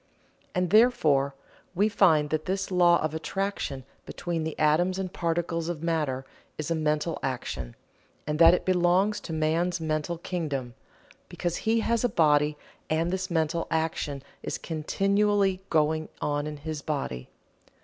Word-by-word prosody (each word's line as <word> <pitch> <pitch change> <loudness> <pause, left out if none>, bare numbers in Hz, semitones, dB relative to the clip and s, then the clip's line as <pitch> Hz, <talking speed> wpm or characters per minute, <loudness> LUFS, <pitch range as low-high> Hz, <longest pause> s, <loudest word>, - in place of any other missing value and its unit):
And 180 -1 0
therefore 155 - +4 0.4
we 200 +4 +3
find 160 -8 +3
that 155 0 -1
this 190 +1 -2
law 175 -1 +5
of 155 -1 -1
attraction 160 -5 -3 0.2
between 170 -2 -3
the 160 0 -4
atoms 165 +5 +2
and 185 -1 -4
particles 170 0 -1
of 165 -2 -4
matter 150 -6 -1 0.3
is 155 +1 -4
a - - +4
mental 155 +1 0
action, 65 - -4 0.5
and 150 +1 -2
that 170 +1 +8
it - - -4
belongs 185 +3 +2
to - - -8
man's 165 +3 0
mental 155 +1 -2
kingdom, 145 -8 -3 0.6
because 175 -1 -2
he 225 0 +3
has 230 +1 0
a 245 - +3
body 150 -3 +3 0.3
and 165 +2 +1
this 190 +1 -2
mental 165 0 0
action 160 -4 -2 0.2
is - - -3
continually 195 +4 +1
going 155 0 +1
on 145 0 -1
in 150 -1 -5
his 150 0 -5
body. 135 - -4
165 Hz, 150 wpm, -27 LUFS, 150-180 Hz, 0.6 s, that